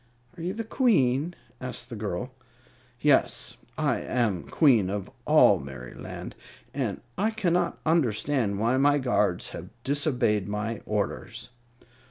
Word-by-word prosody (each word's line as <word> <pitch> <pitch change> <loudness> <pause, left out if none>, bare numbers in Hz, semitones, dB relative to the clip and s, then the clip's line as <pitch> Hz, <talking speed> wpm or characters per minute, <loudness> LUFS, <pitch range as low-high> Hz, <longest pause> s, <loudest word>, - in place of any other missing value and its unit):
"Are 175 - -9
you 180 +3 -2
the 225 +2 -4
Queen?" 170 - +2 0.3
asked 125 -1 -5
the - - -4
girl. 105 +3 -4 0.7
"Yes, 150 -2 +2 0.2
I - - +1
am 110 -8 0
Queen 120 - +4
of 100 -1 -4 0.2
all - - +6
Merryland; 65 -2 -8 0.4
and 125 -8 -2 0.2
I 210 +3 +3
cannot 185 -6 0
understand 130 -7 +1
why 115 +5 +2
my 145 +2 +4
guards 130 -3 +1
have - - -8
disobeyed 130 -8 +1
my 105 +1 -3
orders." 105 -2 -3
125 Hz, 125 wpm, -27 LUFS, 105-150 Hz, 0.7 s, all